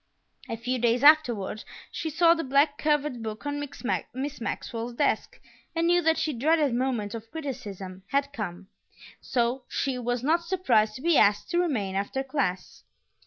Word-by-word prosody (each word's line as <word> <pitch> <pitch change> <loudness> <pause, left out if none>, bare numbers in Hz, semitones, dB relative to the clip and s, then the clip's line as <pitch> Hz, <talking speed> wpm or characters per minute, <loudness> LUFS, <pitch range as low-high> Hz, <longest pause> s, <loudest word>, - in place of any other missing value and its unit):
A 230 - -3
few 250 +2 -2
days 240 +2 +2
afterward 245 -9 +4 0.3
she 320 - -3
saw 335 +2 +5
the 330 -1 -3
black 280 +2 +2
covered 295 -5 0
book 220 +3 -6
on 290 0 -2 0.5
Miss 270 +1 -5
Maxwell's 230 +1 -4
desk - - 0 0.4
and 330 0 +1
knew 350 +1 +4
that 325 -1 +2
the 305 - -1
dreaded 295 +2 +2
moment 240 -5 -1
of 225 -1 -7
criticism 200 - -6
had 280 +4 0
come, 195 -6 -5 0.5
so 250 0 0
she 265 -2 -2
was 245 0 -2
not 330 +5 +2
surprised 260 - +2
to 255 - -9
be 335 -2 +4
asked 205 +9 +3
to 345 - +2
remain 225 - -1
after 200 +8 -2
class. 260 -10 -3
260 Hz, 165 wpm, -27 LUFS, 225-300 Hz, 0.5 s, saw